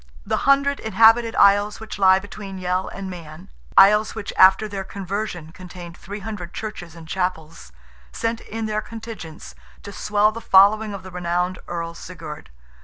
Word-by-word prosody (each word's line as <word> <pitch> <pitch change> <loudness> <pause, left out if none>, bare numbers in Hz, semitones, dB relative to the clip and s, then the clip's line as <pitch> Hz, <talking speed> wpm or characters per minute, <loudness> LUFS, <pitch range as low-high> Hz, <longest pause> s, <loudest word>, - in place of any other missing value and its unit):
The - - -1
hundred 280 0 +3
inhabited 225 +2 +4
isles 205 +1 +4
which 220 -2 -8
lie 190 -1 +6
between 195 0 -8
Yell 185 0 -1
and 195 -1 -7
Man,—isles 170 - +1
which 220 -2 -6
after 190 +3 +6
their 195 -2 -5
conversion 190 -4 -5
contained 175 -1 -11
"three 200 +4 -8
hundred 195 -4 -7
churches 180 -6 -7
and 165 -1 -12
chapels"—sent 155 - -5
in 225 +1 -5
their 215 0 -1
contingents, 220 -8 -9 0.3
to 200 - -8
swell 210 +1 +2
the 230 +1 -8
following 205 +2 +4
of 190 - -9
the 185 - -10
renowned 180 +1 -2
Earl 170 -1 -4
Sigurd. 160 - -9
190 Hz, 150 wpm, -22 LUFS, 175-215 Hz, 0.3 s, lie